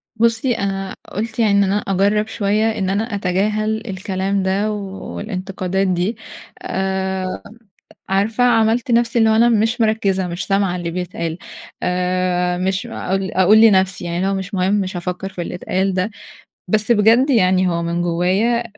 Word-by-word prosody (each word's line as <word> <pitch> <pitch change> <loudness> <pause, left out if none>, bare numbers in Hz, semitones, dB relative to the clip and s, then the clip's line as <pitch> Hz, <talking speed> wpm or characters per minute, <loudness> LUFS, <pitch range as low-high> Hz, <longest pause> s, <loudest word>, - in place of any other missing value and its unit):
بُصّي 230 +2 +1
أنا 195 -1 -3 0.2
قُلت 225 +3 -4
يعني 220 -3 +3
إن 200 0 +4
أنا 195 +1 +1
أجرب 200 +2 +1
شوية 215 0 0
إن 190 -1 -1
أنا 210 +3 -1
أتجاهل 210 +3 -1
الكلام 190 0 -2
ده 195 +3 0
والانتقادات 195 -1 -4
دي، 185 +5 0 0.5
آآ 190 -1 -2 0.7
عارفة 205 +5 +1
عملت 230 0 +2
نفسي 235 0 +2
إن 225 - +4
هو 220 - +3
أنا 235 +2 +5
مش 225 +1 +1
مركِزة، 200 -4 +1
مش 175 +1 -4
سامعة 195 -2 +1
اللي 175 -2 -4
بيتقال، 170 -2 -4 0.5
آآ 180 0 0
مش 190 +5 -1
أقول 195 -3 -3
أقول 195 +4 +5
لنفسي 190 -4 +3
يعني 170 0 -3
اللي 185 +2 0
هو - - 0
مش 195 +1 -5
مُهم، 190 +1 +1
مش 190 -3 -1
هافكر 180 +2 -4
في 185 -2 -6
اللي 170 - -5
اتقال 190 +2 -1
ده، 185 +3 -1 0.6
بس 215 +4 +2
بجد 230 +5 +4
يعني 185 -6 +3
هو 170 -1 -1
من 170 +1 -1
جوايا 185 +8 +1
195 Hz, 160 wpm, -19 LUFS, 185-220 Hz, 0.7 s, أنا